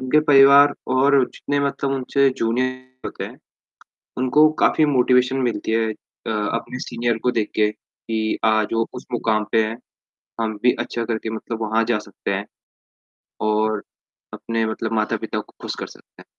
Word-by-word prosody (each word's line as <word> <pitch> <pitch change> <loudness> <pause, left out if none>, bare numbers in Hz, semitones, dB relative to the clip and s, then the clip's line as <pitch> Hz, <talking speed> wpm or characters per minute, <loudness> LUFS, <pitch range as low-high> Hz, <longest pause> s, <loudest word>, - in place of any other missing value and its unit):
उनके 130 +4 +3
परिवार 140 +1 +7 0.2
और 140 +1 +5
जितने 145 0 -3
मतलब 140 0 -1
उनसे 135 +1 +2
जूनियर 130 +2 -2
होते - - -6
हैं - - -10 0.8
उनको 130 +5 +5
काफ़ी 155 - +4
मोटिवेशन 125 -1 +3
मिलती 110 -1 -3
है 115 -1 +1
अ, 110 - -11
अपने 105 +4 -2
सीनियर 120 -1 -1
को 125 - +2
देख 105 - -3
के 105 -1 +3
कि 110 0 -4
आज 110 -1 +2
वो 115 0 +1
उस 125 - -8
मुकाम 110 -3 +1
पे 110 -1 +4
हैं, 115 +2 -5 0.6
हम 110 -1 -1
भी 125 0 +5
अच्छा 120 - -3
करके 110 -1 -3
मतलब 115 +1 -5
वहाँ 110 +1 +1
जा 105 - +1
सकते - - -5
हैं - - -3 1.0
और 110 -1 +1 0.5
अपने 115 -1 -2
मतलब 110 0 -3
माता-पिता - - -3
को - - -14
खुश - - -4
कर - - -4
सकते - - -18
हैं। - - -26
115 Hz, 165 wpm, -21 LUFS, 110-130 Hz, 1.0 s, परिवार